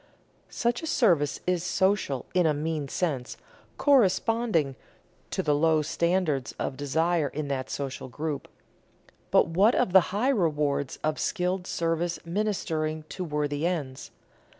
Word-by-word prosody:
Such 235 0 -1
a 325 - -5
service 170 - +2
is 180 -2 0
"social" 190 -8 0
in 180 -3 +3
a 150 - +2
mean 155 -1 -2
sense, 135 -5 -2 0.4
corresponding 225 - +2 0.5
to - - -2
the 150 - +2
low 155 +1 +3
standards 170 -5 0
of 135 - -3
desire 160 +3 +1
in 145 +1 -4
that 130 -2 -2
social 135 -2 -4
group. 150 +3 -4 0.8
But - - +4
what 195 +8 +4
of 220 -8 +1
the 190 - +10
high 210 +8 +1
rewards 150 - 0
of 155 0 0
skilled 180 -1 -1
service 165 +1 -1
ministering 165 -5 -2
to 185 - -5
worthy 150 -1 -1
ends? 145 -7 -4
165 Hz, 135 wpm, -27 LUFS, 145-185 Hz, 0.8 s, the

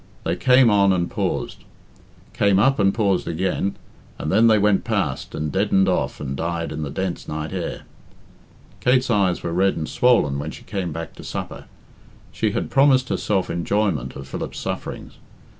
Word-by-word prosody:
They 85 - -1
came 125 +4 +5
on 100 -1 +4
and 85 -1 -1
paused, - - -3 0.7
came 100 -2 +3
up 135 +6 +3
and 95 -1 +4
paused 100 -4 0
again, 95 +3 -1 0.4
and 75 - -3
then 110 +4 +5
they 110 -1 +5
went 105 -1 +2
past - - -2
and 75 -1 -3
deadened 95 +1 +2
off 90 - -1
and 70 -2 -4
died 85 +2 -3
in 75 - -4
the 75 - -3
dense 95 +5 -4
night 75 0 -4
air. - - -4 1.0
Kate's 125 0 +2
eyes 95 -5 +1
were 85 - -3
red 95 +2 +2
and 80 -1 -3
swollen 115 - +2
when 75 +2 -4
she - - -10
came 95 -5 -4
back 80 +2 -6
to - - -10
supper. - - -6 0.7
She - - 0
had - - -3
promised 135 -2 +4
herself 95 -3 0
enjoyment 85 - -1
of 70 -1 -8
Philip's - - -6
sufferings. - - -6
95 Hz, 175 wpm, -22 LUFS, 80-105 Hz, 1.0 s, came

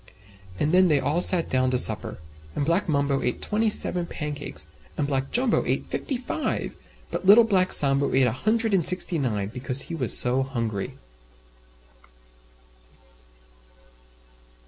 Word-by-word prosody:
And 150 - -1
then 185 +1 +4
they 150 -4 +1
all 150 +6 -1
sat 180 -2 +6
down 130 0 0
to 125 - 0
supper. - - +4 0.4
And 145 - -2
Black 170 +4 -1
Mumbo 140 -2 -1
ate 125 - -3
Twenty 220 +1 -1
seven 180 -4 0
pancakes, 145 - -5 0.3
and 145 - -1
Black 135 -1 -3
Jumbo 245 -1 0
ate - - -3
Fifty 270 - -4
five, 260 +5 -4 0.4
but 185 - -5
Little 215 +4 +7
Black 190 -4 0
Sambo 140 0 +4
ate 130 0 +2
a 125 - 0
Hundred 220 - -1
and 180 -5 +2
Sixty 180 -2 0
nine, 105 -7 -3
because 125 +3 -3
he - - -9
was 130 -8 +1
so 125 +2 +2
hungry. 115 -7 -5
145 Hz, 145 wpm, -23 LUFS, 130-185 Hz, 0.4 s, Little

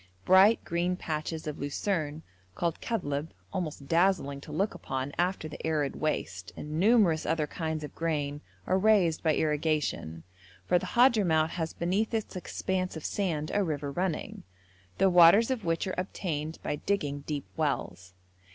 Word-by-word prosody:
Bright 195 +4 +6
green 175 +2 0
patches 160 -1 -4
of 150 -1 -5
lucerne 155 +1 -2 0.3
called 170 -2 -2
kadhlb, 150 -9 -2 0.3
almost 155 -7 -4
dazzling 165 -4 +2
to - - -10
look 200 +2 0
upon 135 +1 -4
after 180 -2 0
the 150 - -9
arid 150 -4 0
waste, 95 -11 -3
and 150 +1 -4
numerous 195 -6 +4
other 160 -1 0
kinds 160 0 -4
of 150 - -7
grain 145 -3 -2 0.2
are 185 - +2
raised 190 -6 +3
by 160 -3 +2
irrigation, 150 - -1 0.4
for 180 - +3
the - - -6
Hadhramout 190 -11 +4
has 165 -2 -3
beneath 200 +7 0
its 220 -3 -3
expanse 185 -1 -2
of 160 - -8
sand 160 -7 -1
a 205 - +2
river 145 -4 -2
running, 175 +1 -3 0.6
the 195 - +4
waters 180 +7 +7
of 235 -7 -2
which 165 -1 0
are 185 - -3
obtained 160 -4 -3
by 150 - -2
digging 145 -5 -1
deep 145 -2 -3
wells. 95 - -2
160 Hz, 155 wpm, -29 LUFS, 150-185 Hz, 0.6 s, waters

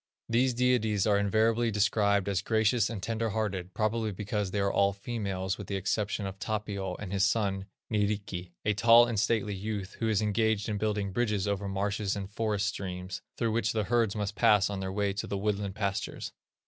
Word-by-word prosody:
These 120 +2 +2
deities 115 -5 +2
are 105 -2 +3
invariably 110 +3 +2
described 100 -1 +2
as 100 -3 0
gracious 110 +2 +2
and 105 -5 -5
tender 115 0 -1
hearted, 95 -4 -3
probably 110 0 0
because 105 0 -2
they 100 - -2
are 100 0 +1
all 100 0 +3
females 100 -3 -3
with 100 - -7
the 100 - -3
exception 100 +2 -1
of 95 0 -6
Tapio 100 -3 -3
and 100 -2 -7
his 100 -1 +2
son, 100 -2 +1 0.2
Nyrikki, 100 -4 -1 0.2
a 105 - +3
tall 115 +3 +7
and 115 -3 -1
stately 105 -1 +1
youth 100 -1 -5
who 115 - 0
is 105 -3 +2
engaged 105 0 +1
in 105 -2 -2
building 105 -2 -1
bridges 105 -2 0
over 100 0 -1
marshes 100 +1 -1
and 100 -1 -5
forest 105 -2 0
streams, 95 -2 -4 0.2
through 115 -2 0
which 110 0 0
the 110 -1 0
herds 115 -2 +1
must 105 -1 -2
pass 105 0 +4
on 100 - -3
their 95 0 -3
way 100 0 0
to 100 - -4
the 100 - -2
woodland 100 -1 -1
pastures. 100 -2 -3
105 Hz, 195 wpm, -29 LUFS, 100-110 Hz, 0.2 s, tall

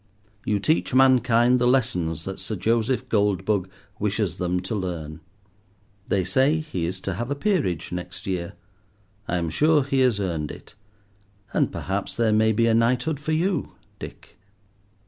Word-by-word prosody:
You 105 -1 +1
teach 145 +3 +1
mankind 125 -2 +5
the 120 - +2
lessons 90 - +1
that 95 0 -5
Sir 110 - -4
Joseph 115 +6 0
Goldbug 100 -2 +1 0.3
wishes 105 -4 -1
them 90 0 0
to 95 +5 -5
learn. 85 -6 -4 0.9
They 95 -2 +1
say 130 - +2
he 95 - -3
is 95 +2 -4
to 95 - -3
have 120 +8 -4
a 140 - -1
peerage 145 - -1
next 90 0 -6
year. 90 -3 -3 0.7
I 90 - 0
am 85 -2 -2
sure 150 - +3
he 135 0 0
has 125 -5 +3
earned 85 -6 -2
it; - - -11 0.8
and - - +2
perhaps 95 +1 -3
there 115 -2 +3
may 110 +1 +4
be 115 +2 +2
a 115 - +3
knighthood 125 +6 +1
for 150 +1 -3
you, 170 0 0 0.3
Dick. - - -11
110 Hz, 160 wpm, -24 LUFS, 90-130 Hz, 0.9 s, mankind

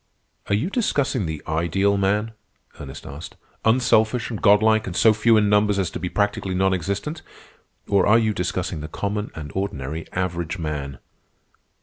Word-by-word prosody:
"Are 100 - +2
you 150 - -1
discussing 140 - 0
the 80 -2 -5
ideal 85 +5 +1
man?" 105 +3 0 0.5
Ernest - - -9
asked, 75 +4 -9 0.3
"—unselfish 120 0 +2
and 110 - -5
godlike, 110 +1 +4
and 90 - -5
so 110 +2 +5
few 110 +1 +4
in 105 -1 +3
numbers 105 0 +3
as 95 -4 -1
to - - -5
be 90 +1 -3
practically 100 -2 -1
non 95 +1 +2
existent, 100 - -3 0.7
or 100 -1 +3
are 105 +2 +6
you 110 -2 +1
discussing 90 -2 -2
the 75 - -6
common 105 +5 -3
and 75 -2 -7
ordinary 80 -5 -4
average 90 -1 -2
man?" 75 -4 -4
100 Hz, 160 wpm, -23 LUFS, 85-110 Hz, 0.7 s, are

